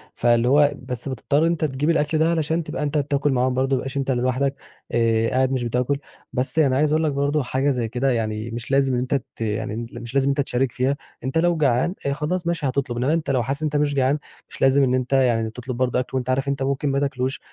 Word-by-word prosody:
فاللي 120 Hz, 0 st, +3 dB
هو 145 Hz, +2 st, +5 dB
بس 125 Hz, +1 st, -4 dB
بتضطر 140 Hz, +3 st, 0 dB
إن -, -, +3 dB
أنت 165 Hz, -2 st, 0 dB
تجيب 145 Hz, +2 st, -1 dB
الأكل 155 Hz, -1 st, +2 dB
ده 160 Hz, +1 st, +3 dB
علشان 160 Hz, 0 st, 0 dB
تبقى 150 Hz, -, -4 dB
أنت 150 Hz, +1 st, -1 dB
بتاكل 140 Hz, 0 st, +1 dB
معاهم 125 Hz, 0 st, +1 dB
برضه 135 Hz, +1 st, +1 dB
ما -, -, 0 dB
يبقاش 135 Hz, +2 st, -5 dB
أنت 135 Hz, -1 st, 0 dB
لوحدك 130 Hz, +2 st, 0 dB, 0.4 s
آآ، 115 Hz, -1 st, +2 dB
قاعد 130 Hz, 0 st, +1 dB
مش 130 Hz, -2 st, -1 dB
بتاكل، 125 Hz, +4 st, 0 dB, 0.4 s
بس 130 Hz, +5 st, -1 dB
أنا 135 Hz, -4 st, +3 dB
عايز 150 Hz, +1 st, +2 dB
أقول 155 Hz, +1 st, +2 dB
لك 155 Hz, -, +1 dB
برضه 140 Hz, +1 st, 0 dB
حاجة 135 Hz, +3 st, 0 dB
زي 120 Hz, -3 st, -1 dB
كده 125 Hz, +3 st, 0 dB
يعني 110 Hz, -1 st, -2 dB
مش 120 Hz, +2 st, -6 dB
لازم 135 Hz, -2 st, +3 dB
إن 125 Hz, +1 st, -1 dB
تت 135 Hz, -2 st, 0 dB, 0.2 s
يعني 110 Hz, +1 st, -2 dB
مش 120 Hz, 0 st, -8 dB
لازم 135 Hz, -1 st, +2 dB
إن -, -, +3 dB
أنت 140 Hz, -, +1 dB
تشارك 130 Hz, -2 st, 0 dB
فيها، 135 Hz, +3 st, 0 dB, 0.3 s
أنت 135 Hz, +5 st, -2 dB
لو 170 Hz, 0 st, +2 dB
جعان 140 Hz, +5 st, +2 dB
آآ، 140 Hz, -, +1 dB
خلاص 170 Hz, +5 st, -2 dB
ماشي 170 Hz, -3 st, -1 dB
هتطلب، 130 Hz, -2 st, -2 dB
إنّما 130 Hz, +5 st, +1 dB
أنت 165 Hz, -3 st, -1 dB
لو 125 Hz, -3 st, +1 dB
حاسس 135 Hz, +6 st, -3 dB
إن -, -, 0 dB
أنت 150 Hz, -1 st, -2 dB
مش 145 Hz, -1 st, +2 dB
جعان 135 Hz, +2 st, +2 dB, 0.3 s
مش -, -, -12 dB
لازم 135 Hz, +1 st, +5 dB
إن 125 Hz, -1 st, +2 dB
أنت 130 Hz, +1 st, -1 dB
يعني 120 Hz, -4 st, +3 dB
تطلب 125 Hz, +2 st, -6 dB
برضه 125 Hz, 0 st, +1 dB
أكل، 130 Hz, +1 st, -3 dB
وأنت 125 Hz, 0 st, -3 dB
عارف 135 Hz, +2 st, 0 dB
إن -, -, +2 dB
أنت 135 Hz, -1 st, -2 dB
ممكن 140 Hz, +1 st, 0 dB
ما 140 Hz, 0 st, +1 dB
تاكلهوش، 135 Hz, -2 st, -2 dB
135 Hz, 255 wpm, -23 LUFS, 125-145 Hz, 0.4 s, هو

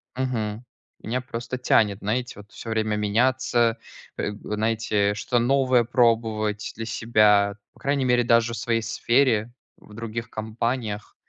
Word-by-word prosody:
мгм. 115 Hz, -4 st, -2 dB, 0.4 s
Меня 125 Hz, +3 st, -2 dB
просто 125 Hz, -1 st, -5 dB
тянет 105 Hz, -5 st, +2 dB
знаете 120 Hz, +2 st, -3 dB
вот 105 Hz, +1 st, -14 dB
всё 115 Hz, -, -9 dB
время 110 Hz, -1 st, 0 dB
меняться, 115 Hz, +2 st, +1 dB, 0.4 s
э, -, -, -2 dB
знаете, 105 Hz, -1 st, 0 dB
что-то 120 Hz, +4 st, 0 dB
новое 130 Hz, 0 st, +3 dB
пробовать 110 Hz, -3 st, +1 dB
для 115 Hz, -, -5 dB
себя, 105 Hz, -3 st, +3 dB, 0.2 s
по -, -, -22 dB
крайней 140 Hz, -1 st, 0 dB
мере 125 Hz, -1 st, +3 dB
даже 115 Hz, 0 st, +3 dB
в -, -, -4 dB
своей 115 Hz, -1 st, 0 dB
сфере, 120 Hz, 0 st, +1 dB, 0.2 s
в 105 Hz, -, -17 dB
других 115 Hz, +1 st, -5 dB
компаниях, 110 Hz, 0 st, -3 dB
115 Hz, 140 wpm, -24 LUFS, 105-120 Hz, 0.4 s, новое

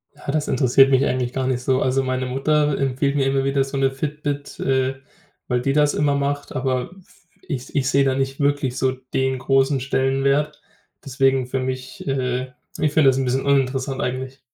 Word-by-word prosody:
Ja, -, -, -5 dB
das 150 Hz, 0 st, -1 dB
interessiert 130 Hz, +1 st, +4 dB
mich 135 Hz, 0 st, +3 dB
eigentlich 125 Hz, -1 st, -1 dB
gar 130 Hz, -1 st, -1 dB
nicht 125 Hz, -1 st, -1 dB
so. 130 Hz, 0 st, +1 dB
Also, 130 Hz, +1 st, +1 dB
meine 130 Hz, 0 st, -1 dB
Mutter 145 Hz, +3 st, +1 dB
empfiehlt 135 Hz, +1 st, 0 dB
mir 140 Hz, -2 st, +2 dB
immer 135 Hz, 0 st, +1 dB
wieder 135 Hz, 0 st, +1 dB
so 135 Hz, +1 st, -5 dB
'ne 135 Hz, 0 st, +2 dB
Fitbit, 145 Hz, 0 st, -4 dB
äh, 130 Hz, 0 st, 0 dB, 0.5 s
weil 125 Hz, -1 st, 0 dB
die 135 Hz, +1 st, 0 dB
das 150 Hz, -1 st, +3 dB
immer 145 Hz, -1 st, +1 dB
macht, 145 Hz, +1 st, -2 dB
aber 130 Hz, +1 st, -1 dB
f 175 Hz, -1 st, -22 dB, 0.2 s
ich 135 Hz, -6 st, -5 dB
ich 140 Hz, -2 st, +1 dB
sehe 140 Hz, 0 st, +3 dB
da 135 Hz, -1 st, +1 dB
nicht 135 Hz, 0 st, -2 dB
wirklich 140 Hz, -3 st, 0 dB
so 130 Hz, -, +1 dB
den 130 Hz, 0 st, -2 dB
großen 135 Hz, +1 st, +2 dB
Stellenwert. 135 Hz, +3 st, 0 dB, 0.4 s
Deswegen 135 Hz, -1 st, +1 dB
für 130 Hz, -, -2 dB
mich 130 Hz, 0 st, -5 dB
äh, 130 Hz, -1 st, -1 dB, 0.3 s
ich 150 Hz, -, +1 dB
finde 150 Hz, -4 st, +5 dB
das 130 Hz, -, +1 dB
ein 135 Hz, -, 0 dB
bisschen 130 Hz, +1 st, 0 dB
uninteressant 135 Hz, -1 st, 0 dB
eigentlich. 130 Hz, +2 st, -4 dB
135 Hz, 195 wpm, -22 LUFS, 130-140 Hz, 0.5 s, finde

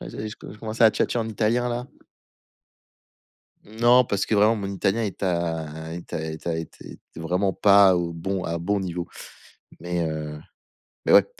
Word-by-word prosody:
je -, -, -7 dB
je 110 Hz, -, -6 dB
je 105 Hz, -1 st, -10 dB
commence 110 Hz, 0 st, -6 dB
à 115 Hz, -1 st, +8 dB
tchatcher 120 Hz, -, 0 dB
en 115 Hz, -1 st, -2 dB
italien, 115 Hz, +3 st, +1 dB
là. 120 Hz, +1 st, -3 dB, 1.8 s
Non, 120 Hz, +4 st, +4 dB
parce 100 Hz, -3 st, -1 dB
que 110 Hz, -, 0 dB
vraiment 105 Hz, +2 st, +5 dB
mon 100 Hz, -3 st, -4 dB
italien 100 Hz, +3 st, 0 dB
est 100 Hz, -1 st, -4 dB
à 80 Hz, -3 st, -2 dB
est 85 Hz, 0 st, -9 dB
à -, -, -2 dB
est 80 Hz, +1 st, -6 dB
à 85 Hz, -, 0 dB
était 80 Hz, -1 st, -7 dB
était -, -, -14 dB
vraiment 90 Hz, +4 st, 0 dB
pas 100 Hz, -2 st, +6 dB
au 85 Hz, -1 st, -2 dB
bon 95 Hz, +3 st, -3 dB
à 85 Hz, -, -2 dB
bon 100 Hz, +4 st, 0 dB
niveau. 90 Hz, -2 st, -4 dB, 0.7 s
Mais, 85 Hz, 0 st, -2 dB
heu, 75 Hz, -1 st, -5 dB, 0.7 s
mais -, -, +3 dB
ouais. -, -, +7 dB
95 Hz, 180 wpm, -24 LUFS, 85-110 Hz, 1.8 s, à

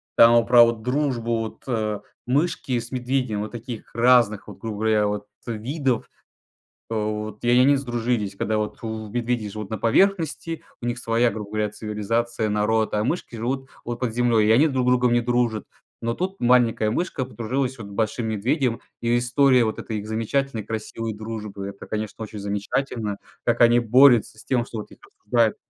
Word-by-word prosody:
Там 115 Hz, 0 st, +8 dB
вот 115 Hz, -, +5 dB
про 120 Hz, -1 st, +8 dB
вот 115 Hz, -1 st, +1 dB
дружбу 125 Hz, -3 st, 0 dB
вот, 110 Hz, -1 st, -6 dB
э, 110 Hz, -4 st, -1 dB, 0.3 s
мышки 135 Hz, -2 st, 0 dB
с 115 Hz, -, -8 dB
медведем 125 Hz, -4 st, -1 dB
вот 105 Hz, -, -5 dB
таких 120 Hz, -1 st, -8 dB
разных, 115 Hz, -3 st, +4 dB
вот, -, -, -10 dB
грубо 110 Hz, -2 st, -5 dB
говоря, 110 Hz, -1 st, +2 dB
вот 105 Hz, 0 st, -3 dB, 0.2 s
видов. 125 Hz, +2 st, -2 dB, 0.8 s
Вот. 105 Hz, -1 st, -3 dB
И 120 Hz, -, +1 dB
они 125 Hz, +4 st, +5 dB
сдружились. 120 Hz, -5 st, -2 dB
Когда 110 Hz, +2 st, -1 dB
вот 105 Hz, 0 st, -3 dB
медведи 110 Hz, 0 st, -2 dB
живут 105 Hz, -1 st, -7 dB
на 110 Hz, -, -2 dB
поверхности, 165 Hz, -, +1 dB, 0.2 s
у -, -, -5 dB
них 120 Hz, 0 st, -2 dB
своя, 115 Hz, +1 st, +2 dB
грубо 105 Hz, -1 st, -6 dB
говоря, 105 Hz, -1 st, 0 dB
цивилизация, 110 Hz, +2 st, -2 dB
народ, 110 Hz, +1 st, +1 dB
а 105 Hz, 0 st, +1 dB
мышки 125 Hz, -2 st, -2 dB
живут 130 Hz, +4 st, -3 dB
вот 120 Hz, 0 st, -5 dB
под 120 Hz, -4 st, -2 dB
землей, 120 Hz, -3 st, +3 dB
и -, -, +5 dB
они 140 Hz, +8 st, +5 dB
друг 130 Hz, -3 st, 0 dB
с -, -, +5 dB
другом 125 Hz, -1 st, +3 dB
не 120 Hz, -, +3 dB
дружат. 120 Hz, -2 st, 0 dB, 0.4 s
Но 115 Hz, 0 st, -1 dB
тут 190 Hz, +5 st, -3 dB
маленькая 120 Hz, -3 st, +3 dB
мышка 135 Hz, -1 st, -2 dB
подружилась 130 Hz, +2 st, -2 dB
вот 105 Hz, -, -7 dB
с -, -, -11 dB
большим 110 Hz, +2 st, -1 dB
медведем, 115 Hz, +3 st, 0 dB, 0.2 s
и 120 Hz, +1 st, +2 dB
история 125 Hz, +1 st, +4 dB
вот 110 Hz, -, -2 dB
этой 110 Hz, -, -4 dB
их 105 Hz, -, -8 dB
замечательной 115 Hz, +2 st, -1 dB
красивой 110 Hz, 0 st, -4 dB
дружбы- 105 Hz, -2 st, -6 dB
это, 100 Hz, 0 st, -11 dB
конечно, 110 Hz, +1 st, -4 dB
очень 110 Hz, 0 st, -8 dB
замечательно. 105 Hz, +2 st, -2 dB, 0.3 s
Как -, -, +1 dB
они 120 Hz, 0 st, +6 dB
борются 120 Hz, -1 st, +5 dB
с -, -, -13 dB
тем, 125 Hz, -3 st, +1 dB
что 115 Hz, -, -6 dB
вот 105 Hz, -, -9 dB
их -, -, -14 dB
обсуждает 115 Hz, +1 st, 0 dB
115 Hz, 180 wpm, -24 LUFS, 110-125 Hz, 0.8 s, Там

